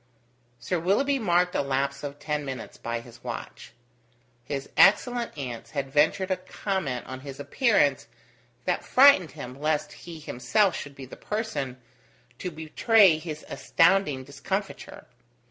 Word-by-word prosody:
Sir 180 +7 -2
Willoughby 270 +11 +1
marked 180 -4 +2
a - - +1
lapse 140 0 -1
of 145 0 -5
ten 150 0 -3
minutes 130 -4 -6
by 115 0 -4
his 120 -1 -15
watch. - - -7 0.7
His 140 +1 -4
excellent 240 0 +4
aunts 125 -5 -6
had 135 -1 -2
ventured 160 +6 +2
a 185 - +1
comment 185 - -3
on 130 0 -7
his 135 0 -9
appearance 145 - +2 0.6
that - - 0
frightened 255 - +6
him 125 +2 -8
lest 150 0 0
he 170 -2 -10
himself 175 - +1
should 140 -1 -7
be 135 - -9
the 125 - -12
person 210 - -4 0.6
to 180 - -3
betray 165 +3 +4
his 155 -1 -7
astounding 165 -6 +2
discomfiture. 135 0 -5
155 Hz, 140 wpm, -26 LUFS, 135-190 Hz, 0.7 s, frightened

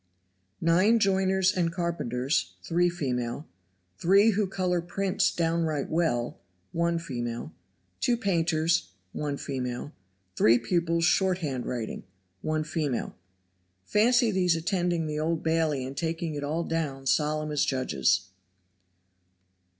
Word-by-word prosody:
Nine 185 +8 +4
joiners 190 -1 +2
and 170 -2 +1
carpenters, 135 - -1
3 175 +1 +2
female; 130 -4 -3 0.5
3 200 +5 +5
who 205 0 0
color 180 -2 0
prints 195 +2 0
downright 165 -3 -1
well, 155 -8 0 0.3
1 170 0 +1
female; 120 -7 -5 0.5
2 240 - +2
painters, 165 - +1 0.2
1 145 -1 -3
female; 130 0 -4 0.4
3 115 +2 +5
pupils 165 +6 0
shorthand 175 -9 +1
writing, 120 -3 -4 0.4
1 155 0 -1
female. 150 -5 -2 0.7
[Fancy 235 - +3
these 180 -3 +2
attending 175 -1 0
the 150 0 -3
Old 160 +1 -1
Bailey 160 -5 +1
and 135 +1 -7
taking 165 +2 -2
it 145 -1 -4
all 155 +4 -1
down 150 -5 -3
solemn 155 +2 +1
as 150 - +1
judges. 95 -8 +1
165 Hz, 115 wpm, -27 LUFS, 140-180 Hz, 0.7 s, 3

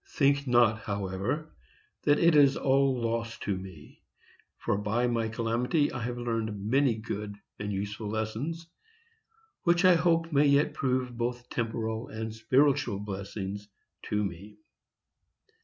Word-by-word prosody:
Think 140 -1 +2
not, 120 -3 +4
however, 100 - -3 0.5
that 145 0 +5
it 170 -2 +4
is 140 -2 +6
all 135 -1 +2
loss 115 0 -2
to 100 - -1
me, 95 -5 -11 0.6
for - - -1
by 105 +4 0
my 115 -2 0
calamity 120 +7 0
I 125 - -4
have 120 +1 -3
learned 115 -3 -2
many 135 0 +3
good 105 -2 -5 0.2
and 105 0 -3
useful 105 +2 -4
lessons, 110 +10 -3 1.0
which 175 +1 +3
I 185 - +8
hope 165 0 +2
may 145 +1 +5
yet 140 +2 +3
prove 125 -2 -1
both 120 +1 -3
temporal 110 -1 -2
and 110 0 -5
spiritual 125 0 +2
blessings 100 0 -5 0.4
to 105 0 +1
me. 100 +3 -6
115 Hz, 135 wpm, -29 LUFS, 105-135 Hz, 1.0 s, I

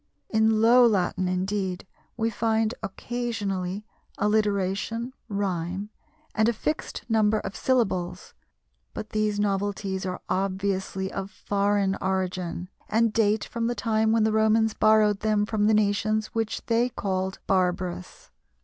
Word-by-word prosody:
In 220 0 +3
Low 245 +2 +7
Latin, 185 -3 +1
indeed, 185 0 -2 0.3
we 225 0 0
find 220 0 +1
occasionally 205 -3 -3 0.3
alliteration, 210 +3 0 0.2
rhyme, 195 0 -2 0.4
and 220 +1 +3
a - - +1
fixed 305 +8 -3
number 220 -2 +3
of 195 - -6
syllables, 195 -9 0 0.6
but 215 - -6
these 215 -1 0
novelties 200 -1 -1
are 180 - -4
obviously 190 0 -1
of 195 0 -4
foreign 200 -1 0
origin, 185 -2 -2 0.2
and 225 0 +2
date 215 -2 +2
from 230 -1 -2
the 240 - -1
time 220 -2 +1
when 225 -1 +3
the 220 0 +2
Romans 220 0 +3
borrowed 215 -2 +4
them 215 -1 +1
from 210 -1 +1
the 220 - +4
nations 215 +1 +1
which 225 -1 -2
they 235 +1 +2
called 190 -4 -2
barbarous. 180 -1 -1
210 Hz, 130 wpm, -26 LUFS, 190-220 Hz, 0.6 s, Low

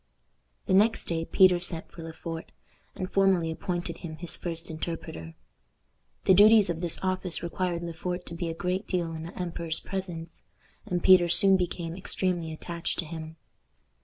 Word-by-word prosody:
The - - 0
next 215 +4 +4
day 165 -1 -2
Peter 185 -1 +5
sent 175 -2 -4
for 170 - -10
Le 165 0 -7
Fort, 165 0 -7 0.4
and 185 -2 -4
formally 190 -4 +3
appointed 175 0 -4
him 160 -3 -7
his 165 +1 -2
first 165 -1 -5
interpreter. 155 - -6 0.9
The 190 - +6
duties 210 0 +7
of 165 0 -5
this 175 -2 +1
office 185 -2 -1
required 175 0 -2
Le 170 -1 -5
Fort 180 +2 -4
to - - -7
be 170 0 -3
a 165 - -4
great 180 +4 -2
deal 170 -3 -1
in 160 - -6
the 175 - -10
emperor's 170 -2 -1
presence, 175 -4 -6 0.5
and 175 -1 -1
Peter 180 -2 +7
soon 195 +3 +7
became 175 -2 -2
extremely 180 -3 -2
attached 170 +1 -4
to 175 - -2
him. 160 0 -7
175 Hz, 170 wpm, -28 LUFS, 165-185 Hz, 0.9 s, duties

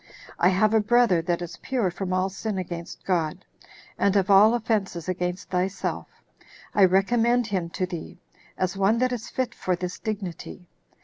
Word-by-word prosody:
I 180 - +5
have 205 +3 +2
a 220 - +5
brother 215 -5 +3
that 175 0 -1
is 170 -1 -8
pure 240 -9 0
from 185 +1 -4
all 185 +1 +1
sin 200 +1 -4
against 170 -2 -6
God, 175 -1 -1 0.5
and 200 0 +2
of 200 0 +2
all 210 +4 +7
offenses 205 -7 -1
against 180 +1 -3
thyself; 185 +2 -2 0.7
I 200 - +6
recommend 230 +6 +3
him 190 -6 -2
to 185 - -2
thee, 175 -3 -7 0.4
as 185 0 -1
one 195 +3 +2
that 255 +1 +1
is 240 -2 -4
fit 255 -2 -2
for 185 - -1
this 180 0 -5
dignity." 190 -4 -6
190 Hz, 170 wpm, -25 LUFS, 180-220 Hz, 0.7 s, all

